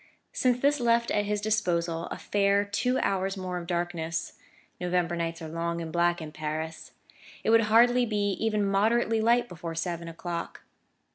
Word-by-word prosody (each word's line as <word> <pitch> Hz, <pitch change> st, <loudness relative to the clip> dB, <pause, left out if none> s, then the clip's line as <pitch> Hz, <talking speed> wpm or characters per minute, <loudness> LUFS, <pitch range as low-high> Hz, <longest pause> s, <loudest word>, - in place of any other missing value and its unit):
This 265 Hz, +4 st, +3 dB
left 235 Hz, -1 st, +2 dB
at 205 Hz, 0 st, +1 dB
his 210 Hz, 0 st, -1 dB
disposal 170 Hz, -6 st, 0 dB
a -, -, -6 dB
fair 200 Hz, 0 st, +2 dB
two 250 Hz, +6 st, 0 dB
hours 195 Hz, 0 st, 0 dB
more 180 Hz, -1 st, -3 dB
of 170 Hz, -, -9 dB
darkness: 170 Hz, -2 st, -2 dB, 0.5 s
November 180 Hz, -1 st, 0 dB
nights 165 Hz, -1 st, -3 dB
are -, -, -5 dB
long 170 Hz, +1 st, -3 dB
and 165 Hz, -1 st, -5 dB
black 175 Hz, 0 st, +2 dB
in 155 Hz, -2 st, -7 dB
Paris; 155 Hz, +1 st, -5 dB, 0.5 s
it 220 Hz, -, +2 dB
would 230 Hz, -1 st, +5 dB
hardly 240 Hz, +3 st, +5 dB
be 205 Hz, -2 st, 0 dB
even 215 Hz, -2 st, +1 dB
moderately 220 Hz, +3 st, +2 dB
light 235 Hz, +2 st, +3 dB
before 165 Hz, -3 st, -7 dB
seven 170 Hz, 0 st, -3 dB
o'clock. 170 Hz, 0 st, -6 dB
190 Hz, 160 wpm, -28 LUFS, 170-220 Hz, 0.5 s, would